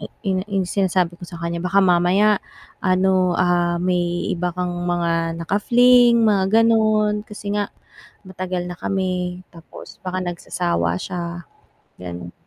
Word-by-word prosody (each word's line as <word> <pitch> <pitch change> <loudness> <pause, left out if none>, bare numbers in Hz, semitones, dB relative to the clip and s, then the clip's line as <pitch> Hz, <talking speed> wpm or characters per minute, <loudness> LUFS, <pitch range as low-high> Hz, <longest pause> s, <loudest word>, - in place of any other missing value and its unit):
i - - -7 0.2
'yung 185 - 0
'yung 195 -2 0
sinasabi 180 -2 0
ko 175 - -9
sa 170 - -9
kaniya, 170 0 -4
"baka 190 +2 +2
mamaya 185 +4 +3 0.4
ano, 185 -1 +2
ah, 175 -1 +2
may 175 0 -1
iba 180 0 -2
kang 180 -1 -2 0.2
mga 165 -1 0
naka-fling," 240 +5 +5
mga 210 +1 +3
gano'n, 215 -2 +2
kasi 205 -1 -6
nga 205 -1 -1 0.6
matagal 185 -1 -4
na 175 - -7
kami, 185 -1 -2
tapos 165 -1 -13
baka 185 0 -3
nagsasawa 85 - -2
siya, 175 -1 -5 0.6
gano'n. 85 -1 -7
180 Hz, 135 wpm, -21 LUFS, 175-195 Hz, 0.6 s, naka-fling